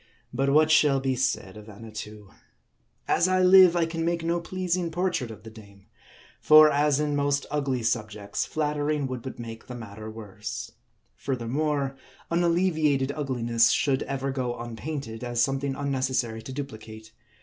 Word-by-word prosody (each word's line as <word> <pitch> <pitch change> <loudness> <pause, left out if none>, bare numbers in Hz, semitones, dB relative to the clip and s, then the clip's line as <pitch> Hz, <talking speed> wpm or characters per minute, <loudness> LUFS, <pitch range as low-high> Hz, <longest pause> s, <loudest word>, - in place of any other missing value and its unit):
But 135 +3 +1
what 155 +2 +4
shall 145 -3 +4
be 135 -1 -1
said 130 -7 -1
of 105 +1 -12
Annatoo? 105 -1 -9 0.8
As 175 - +3
I 185 0 +2
live, 185 -1 +7
I 170 -1 +2
can 165 0 -3
make 170 0 -1
no 170 +1 0
pleasing 180 0 -2
portrait 175 -7 -1
of 110 -1 -11
the 110 - -10
dame; 100 -3 -16 0.5
for 155 0 +7
as 145 0 +2
in 150 -1 0
most 145 0 0
ugly 135 -5 -1
subjects, 105 -3 -2
flattering 150 -1 -1
would 130 -2 -4
but 130 - -8
make 115 -1 -9
the 125 - -7
matter 110 -2 -8
worse. 110 +1 -7 0.4
Furthermore, 135 +2 -2 0.4
unallevi 170 -1 +1
ated 135 -1 +1
ugliness 120 -5 +1
should 135 -2 +1
ever 135 0 -3
go 125 -2 -3
unpainted, 120 0 -6
as 120 -1 +1
something 135 +1 -1
unne 140 -1 -2
cessary 120 -4 -1
to - - -7
duplicate. 110 -5 -8
135 Hz, 160 wpm, -26 LUFS, 115-150 Hz, 0.8 s, live